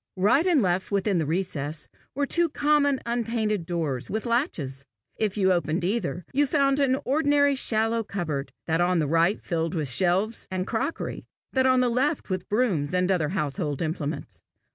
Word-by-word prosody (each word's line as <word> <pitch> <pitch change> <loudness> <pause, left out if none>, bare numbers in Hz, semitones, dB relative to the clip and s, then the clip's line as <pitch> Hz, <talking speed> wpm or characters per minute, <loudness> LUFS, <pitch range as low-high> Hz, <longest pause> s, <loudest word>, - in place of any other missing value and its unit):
Right 210 - +3
and 320 -9 +4
left 185 0 0
within 200 -2 +1
the 155 - -1
recess, 155 -3 -2 0.3
were 285 +1 +1
two 340 +3 +1
common, 290 -2 +2
unpainted 225 -5 -1
doors, 155 -8 -2
with 220 +2 -3
latches. 170 - -1 0.3
If 215 -2 -1
you 190 -2 +4
opened 170 0 -1
either, 180 -5 -2
you 285 +2 +3
found 275 0 +2
an 265 -2 +3
ordinary 285 0 +3
shallow 225 -3 +1
cupboard, 160 -9 -4
that 165 +1 +1
on 180 +1 +2
the 160 - +2
right 165 +6 +2
filled 165 -1 -2
with 150 -5 -2
shelves 185 - 0
and 185 -1 -2
crockery, 265 +9 -3 0.3
that 260 -1 +3
on 255 -1 +4
the 250 - +3
left 265 - 0
with 185 -1 -3
brooms 190 - +1
and 180 +1 +2
other 165 -5 +1
household 150 -3 -2
implements. 155 -2 -4
195 Hz, 170 wpm, -26 LUFS, 165-255 Hz, 0.3 s, and